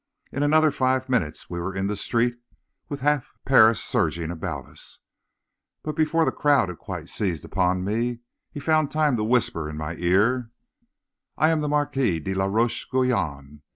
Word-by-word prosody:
In 140 - -3
another 155 +1 +4
five 130 -1 0
minutes 90 -12 -1
we 85 - -5
were 95 +2 -4
in 95 0 -1
the 105 +1 -1
street, 120 +4 0 0.5
with 145 -2 -5
half 145 -1 +1
Paris 115 -4 +6
surging 85 -1 -1
about 85 -2 -5
us, - - -9 0.9
but 155 -1 -4
before 160 +1 +2
the - - +1
crowd 140 -10 +2
had 90 - -8
quite - - -7
seized 90 -8 -2
upon 90 -1 0
me, 115 +4 -1 0.3
he - - -7
had 140 - -12
found 155 -2 +3
time 155 -4 +2
to 105 - -1
whisper 110 -9 +1
in 75 - -7
my 75 +1 -4
ear: 105 +8 +2 0.9
"'I 155 - +4
am 160 -1 +1
the 150 - -1
Marquis 135 - +1
de 95 +5 -3
la 95 0 0
Roche 110 +5 0
Guyon. 80 - -1
120 Hz, 180 wpm, -24 LUFS, 90-140 Hz, 0.9 s, Paris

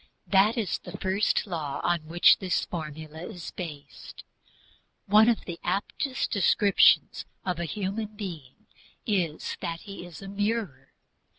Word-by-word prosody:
All 190 - +7
men 195 - +7
are - - +3
reflectors 220 - -2
that 235 - +1
is 195 - -2
THE - - -5
FIRST 195 +2 +1
LAW 160 -8 -4
on 175 -1 +2
which 170 +2 +6
this 185 -2 0
formula 155 -1 -7
is 180 -7 -8
based. 155 -6 -9 0.8
One 215 +3 +6
of 235 - 0
the 170 -2 -6
aptest 205 +8 -2
descriptions 200 0 +4 0.2
of 180 -2 -1
a 170 - -1
human 210 +4 -4
being 180 - -8 0.4
is 175 -8 -1
that 170 -2 -4
he 200 -3 -9
is 175 +2 -11
a - - -7
mirror. 200 - -2
185 Hz, 160 wpm, -27 LUFS, 165-205 Hz, 0.8 s, All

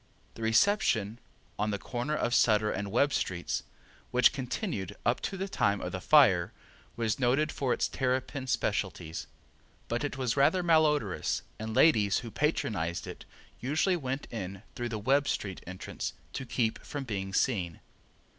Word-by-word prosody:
The - - -11
Reception, 115 - +2 0.4
on 105 +1 +1
the 105 - -1
corner 125 +8 -3
of 120 -5 0
Sutter 105 -3 +4
and 100 +1 -3
Webb 140 +6 +3
streets, 90 -1 -1 0.5
which 125 -1 +5
continued 125 - -3
up 120 - +2
to 195 - -3
the 190 +1 -2
time 100 - +1
of 90 - -4
the 95 - -4
fire, 100 - +5 0.4
was 110 -1 -1
noted 135 +4 +2
for 135 -3 -1
its - - +1
terrapin 130 +1 -2
specialties, 95 -8 -2 0.6
but 120 +3 -1
it 145 -1 -3
was 125 -3 0
rather 145 +7 +3
malodorous 150 - +2 0.2
and 110 0 -4
ladies 105 -11 +4
who 115 - -7
patronized 100 - -1
it - - -9 0.3
usually 155 +8 +1
went 135 -3 -3
in 100 -2 -5
through 120 0 -3
the 115 - -3
Webb 135 +7 +2
street 95 -3 -2
entrance 95 0 -5 0.2
to 130 - -5
keep 115 -2 0
from 145 -2 -5
being 100 -6 -4
seen. 95 - 0
120 Hz, 155 wpm, -30 LUFS, 100-140 Hz, 0.6 s, which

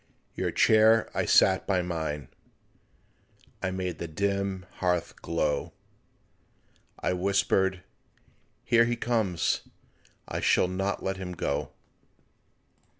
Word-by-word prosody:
Your - - -2
chair 110 +1 +4
I - - 0
set 95 -3 +4
by 95 -3 +1
mine, 80 -5 -4 1.3
I 95 - -1
made 90 -3 -4
the 85 - -4
dim 100 +2 -2
hearth 90 -2 -1
glow, 75 -3 -1 1.3
I - - 0
whispered, 95 0 +1 0.9
"When 115 -1 +5
he 120 - 0
comes 110 -7 0 0.7
I - - -3
shall - - +3
not 95 +2 -2
let 95 0 -2
him 90 -1 -6
go." 70 -4 -3
95 Hz, 105 wpm, -28 LUFS, 90-100 Hz, 1.3 s, When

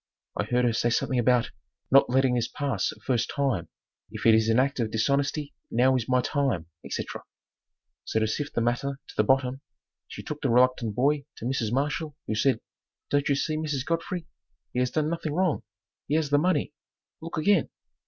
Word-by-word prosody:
I 100 - -1
heard 125 +2 +1
her 120 - +2
say 120 +1 +1
something 125 +2 +1
about 120 0 +3 0.4
"Not 135 -1 +6
letting 130 0 +3
this 120 -2 +1
pass 145 -2 -1
a - - -14
first 120 -3 0
time, 130 - 0 0.4
if - - -7
it 115 - +7
is 110 0 +3
an 110 - +3
act 135 +1 +2
of 115 -2 0
dishonesty 140 +6 0 0.2
now 130 +3 +3
is 125 -2 -2
my 125 0 +4
time," 130 - 0 0.2
etc. - - -5 0.8
So 110 - 0
to 110 - +2
sift 145 +7 -3
the - - +2
matter 130 +4 -1
to - - -10
the 105 - +3
bottom, 130 +2 +1 0.5
she - - -8
took 150 -1 -6
the 135 - +1
reluctant 125 -3 +3
boy 140 +3 +2
to - - -7
Mrs. 120 -4 -1
Marshall, 145 +3 -1
who - - -2
said, 130 +5 +2 0.5
"Don't 145 0 +2
you 140 - +3
see, 155 +2 -1
Mrs. 150 -4 -2
Godfrey, 165 +1 -2 0.5
he 125 - 0
has 125 0 +2
done 155 +2 0
nothing 165 -2 -2
wrong; 180 -4 +1 0.5
he 150 - +1
has 155 -3 0
the 145 - +5
money; 180 -2 +1 0.5
look 165 +1 -6
again." 165 +1 +3
135 Hz, 195 wpm, -27 LUFS, 120-145 Hz, 0.8 s, it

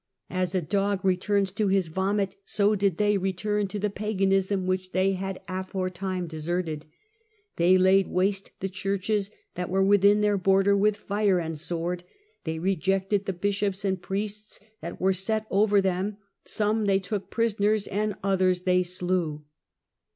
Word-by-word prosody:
"As 185 0 -1
a 180 - +1
dog 195 +3 0
returns 190 +1 +1
to 210 +1 0
his 190 -2 +2
vomit, 195 +3 -1
so 205 +1 +2
did 200 -4 +1
they 210 -1 +2
return 200 +2 -1
to 205 - -5
the 205 0 -1
paganism 195 -2 0
which 185 0 -2
they 190 +1 +2
had 190 0 -4
aforetime 185 0 -3
deserted." 160 -1 -3 0.3
" 430 -1 -42
They 180 +2 +5
laid 190 +1 +4
waste 195 +2 0
the 190 - -1
churches 195 +1 -1 0.2
that 180 0 -4
were 190 +1 +2
within 200 +1 +5
their 205 -1 +2
border 195 +1 +4
with 205 +1 +2
fire 205 -2 +1
and 165 -2 -3
sword; 175 +3 -3 0.4
they 160 0 -2
rejected 195 +3 0
the 195 - 0
bishops 200 +1 -1
and 190 -2 0
priests 210 +3 -4 0.2
that 170 +2 -7
were 190 +1 +3
set 215 +4 -1
over 205 +1 +4
them; 190 +2 -1 0.3
some 215 0 0
they 195 -1 +3
took 195 +1 -4
prisoners 215 -2 +1
and 210 0 -1
others 185 -2 +2
they 180 -1 +3
slew." 175 -4 -2
195 Hz, 160 wpm, -26 LUFS, 185-205 Hz, 0.4 s, They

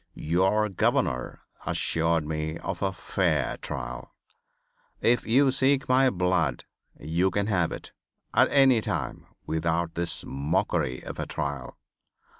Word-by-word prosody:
Your 95 +6 +2
governor 85 -9 0 0.2
assured 80 -1 0
me 80 +1 -3
of 90 0 -5
a 95 -1 +1
fair 95 - 0
trial. - - -6 0.8
If 120 +1 +2
you 135 +4 +4
seek 135 +1 +2
my 130 +1 +4
blood 90 - 0 0.3
you 85 +5 +1
can 100 +1 0
have 95 -6 +1
it - - -7 0.4
at - - +5
any 135 -4 +5
time - - -4 0.2
without 80 +1 -1
this 85 0 -1
mockery 70 -2 -1
of - - -7
a - - -3
trial. 70 -4 -4
85 Hz, 125 wpm, -27 LUFS, 80-110 Hz, 0.8 s, at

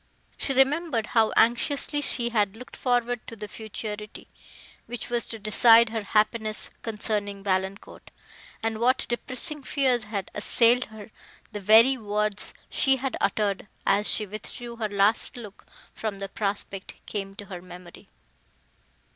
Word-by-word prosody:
She - - -2
remembered 270 -2 +2
how 225 -2 +4
anxiously 280 +5 +2
she 240 -4 +2
had 210 -3 0
looked 250 - -11
forward 245 -1 0
to 230 - -8
the 210 -1 -7
futurity, 210 0 -7 0.6
which 240 0 -6
was 240 -1 +1
to 225 - -7
decide 225 +2 +6
her 225 0 -3
happiness 215 +1 0
concerning 210 -2 -3
Valancourt, 190 0 -3 0.5
and 225 -1 -1
what 250 +3 +2
depressing 270 +5 -2
fears 255 -4 +1
had 200 -3 -5
assailed 235 +4 +4
her; 220 -1 -12 0.4
the 210 - -5
very 225 +6 +6
words 210 -1 0
she 270 -1 +2
had 265 0 -3
uttered, 205 -2 0 0.2
as 205 +2 +3
she 215 - +1
withdrew 235 +3 -8
her 220 -2 -2
last 205 +5 +3
look 210 -4 -11 0.3
from 215 -3 -4
the 195 0 -5
prospect, 200 -1 -3
came 195 -2 -5
to 205 - -8
her 185 -3 -8
memory. 180 -1 -13
220 Hz, 140 wpm, -26 LUFS, 205-240 Hz, 0.6 s, decide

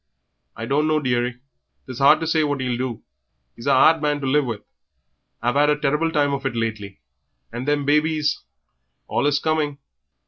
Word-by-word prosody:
"I 110 - -6
dunno, 155 +4 +1
dearie; 125 -2 -1 0.4
'tis 130 -2 -8
hard 145 +3 +5
to - - -1
say 160 -1 +2
what 145 -2 -1
'e'll 125 -2 -1
do; 125 -2 -4 0.5
he's 115 - -9
a - - +4
'ard 155 +4 +5
man 150 -1 0
to - - -3
live 140 +2 +2
with. 110 -4 -4 0.8
I've 120 +2 0
'ad 145 +1 +4
a 150 - +2
terrible 150 +3 0
time 145 -2 +1
of 140 0 -3
it 125 - -4
lately, 110 -4 -4 0.5
and 120 +3 -6
them 145 -1 +1
babies 150 0 +1 0.6
allus 145 0 +1
coming. 150 -1 -1
145 Hz, 175 wpm, -22 LUFS, 125-150 Hz, 0.8 s, hard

